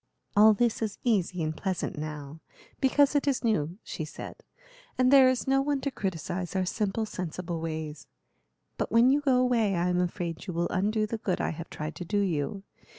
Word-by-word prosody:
"All 215 +1 +7
this 235 +1 +1
is 215 -3 -2
easy 185 -7 +1
and 155 0 -2
pleasant 190 -1 -2
now, 150 0 -6 0.4
because 280 +2 +4
it 285 - +2
is 275 -3 +1
new," 175 -7 0
she 160 - -5
said, 150 - -8 0.6
"and 255 +1 +4
there 265 -2 +8
is 255 -1 0
no 270 0 +3
one 285 0 0
to 280 - -2
criticise 180 - -4
our 190 -1 +1
simple, 210 +3 -1
sensible 175 -4 -5
ways; 155 -2 -5 0.7
but - - -1
when 235 +3 +6
you 290 +2 +3
go 270 -3 +3
away 235 -6 +2
I 175 +1 +1
am 180 0 +2
afraid 175 0 -3
you 180 - -3
will 170 +1 0
undo 215 +4 +1
the 220 +1 -4
good 185 -4 -1
I - - 0
have 165 +1 -7
tried 155 +1 -5
to - - -5
do 195 +5 -2
you. 195 0 -1
195 Hz, 200 wpm, -28 LUFS, 170-235 Hz, 0.7 s, there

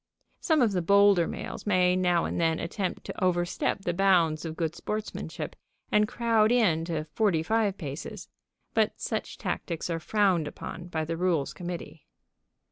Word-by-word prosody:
Some 315 -6 +3
of 225 - +3
the 185 -2 0
bolder 200 -1 +5
males - - -6
may 180 -2 +4
now 180 -2 +2
and - - -2
then 165 -1 +2
attempt 185 +2 -3
to - - -5
overstep 175 +1 0
the 175 - 0
bounds 170 -4 +3
of 160 -1 -4
good 165 -1 -1
sportsmanship 215 +4 -5 0.4
and 210 0 +4
crowd 225 -1 +2
in 200 -10 +3
to 165 -3 -2
forty 165 +1 +1
five 215 0 +1
paces, 145 -1 -6 0.5
but - - +1
such - - -3
tactics 170 0 -3
are 165 - -1
frowned 185 -3 +2
upon 175 +3 -7
by 160 -2 -2
the 165 +1 -3
Rules 170 -5 0
Committee. 175 -3 -7
180 Hz, 160 wpm, -28 LUFS, 165-205 Hz, 0.5 s, bolder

